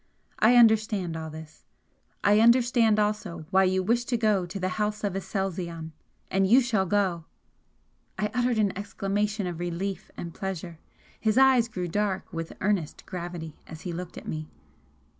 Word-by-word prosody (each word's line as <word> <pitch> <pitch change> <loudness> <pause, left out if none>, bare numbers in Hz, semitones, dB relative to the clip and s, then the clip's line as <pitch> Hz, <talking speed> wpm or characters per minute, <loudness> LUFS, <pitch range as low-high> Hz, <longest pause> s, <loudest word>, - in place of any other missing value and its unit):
I 225 +3 +5
understand 215 -7 +4
all 160 -1 -5
this. 155 0 -11 0.6
I 205 +1 +5
understand 235 -1 +4
also 210 -6 -1
why 190 0 +5
you 185 0 +1
wish 235 +5 +2
to 245 - 0
go 210 -5 +2
to 190 +3 -6
the 185 0 -1
House 210 0 -1
of 200 -3 0
Aselzion, 180 -4 -3 0.4
and 195 0 +3
you 240 +7 +7
shall 220 -7 +1
go 185 -4 0 0.4
" - - -42
I 210 0 -1
uttered 245 -1 +1
an 205 -3 +1
exclamation 205 +1 -2
of 175 -2 -4
relief 175 +2 -4
and 170 -1 -6
pleasure. 180 -4 -5 0.4
His 220 +1 +1
eyes 260 -3 +6
grew 180 -6 -4
dark 195 +1 -2
with 165 0 -4
earnest 190 -6 -1
gravity 170 -3 -6
as 160 -1 -10
he 175 - -5
looked 175 +1 -7
at - - -9
me. 155 -1 -5
195 Hz, 165 wpm, -27 LUFS, 175-215 Hz, 0.6 s, you